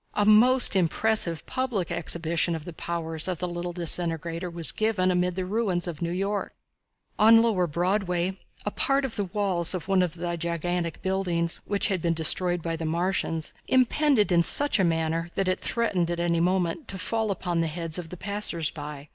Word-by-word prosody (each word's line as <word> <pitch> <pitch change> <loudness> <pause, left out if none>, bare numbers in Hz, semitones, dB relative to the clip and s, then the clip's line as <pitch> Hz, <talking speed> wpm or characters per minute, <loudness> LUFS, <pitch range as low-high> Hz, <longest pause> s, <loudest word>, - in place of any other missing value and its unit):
A 205 - +2
most 235 +3 +6
impressive 180 -1 +2
public 235 -10 -2
exhibition 170 0 0
of 160 -1 -7
the 175 - -8
powers 165 -1 -4
of 185 -2 -2
the 180 - -3
little 175 0 -5
disintegrator 170 0 -1
was 170 -1 +3
given 210 -4 0
amid 180 0 0
the 185 -1 -3
ruins 190 -4 -1
of 165 -4 -6
New 170 - -1
York. 195 +3 -3 0.6
On 225 +1 +7
lower 195 -6 +1
Broadway 180 +2 -1 0.3
a 210 - -1
part 275 +4 +1
of 255 - -5
the 205 - -1
walls 185 -2 -1
of 180 - -6
one 195 -1 +3
of 175 -3 -1
the 175 0 -3
gigantic 170 +1 -3
buildings, 180 -3 -1
which 200 +1 0
had 190 -4 -1
been 170 0 0
destroyed 175 +2 +4
by 165 -1 -2
the 165 - -6
Martians, 165 -1 -1
impended 260 -3 +2
in 170 -1 +4
such 285 +7 +3
a - - +3
manner 165 0 -1
that 195 -1 -1
it 185 0 0
threatened 195 -8 -1
at 175 0 -3
any 170 -1 0
moment 180 - 0
to 195 - -6
fall 220 +3 -2
upon 175 -3 -2
the 165 - 0
heads 165 +1 -2
of 165 -2 -8
the 180 - -8
passers 200 -5 -2
by. 150 -2 -8
180 Hz, 190 wpm, -26 LUFS, 170-200 Hz, 0.6 s, On